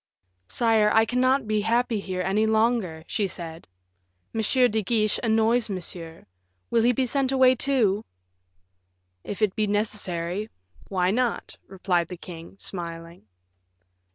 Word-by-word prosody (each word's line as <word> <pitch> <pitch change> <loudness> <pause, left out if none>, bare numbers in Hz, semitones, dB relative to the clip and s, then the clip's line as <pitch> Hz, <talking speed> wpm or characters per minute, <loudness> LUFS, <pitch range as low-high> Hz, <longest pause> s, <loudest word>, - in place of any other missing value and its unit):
"Sire, 220 - +3
I 220 0 +5
cannot 255 +2 +2
be 215 -1 +1
happy 230 +1 +1
here 185 -2 -3
any 210 +4 +1
longer," 220 -7 +1
she 205 +2 -1
said. 165 -2 -8 0.7
"M. 225 - -1
de 220 0 +2
Guiche 215 0 +1
annoys 225 0 +2
Monsieur. 170 -3 -7 0.5
Will 230 - +3
he 240 +2 +4
be 255 +2 0
sent 270 +1 0
away, 260 -1 +5
too?" 235 -6 +1 1.2
"If 205 +1 -4
it 205 -3 +2
be 215 -2 +1
necessary, 205 -2 -2 0.4
why 185 -1 +1
not?" 240 +1 -1
replied 180 -2 0
the 180 - -8
king, 170 0 -10
smiling. 170 - -6
215 Hz, 130 wpm, -25 LUFS, 180-235 Hz, 1.2 s, I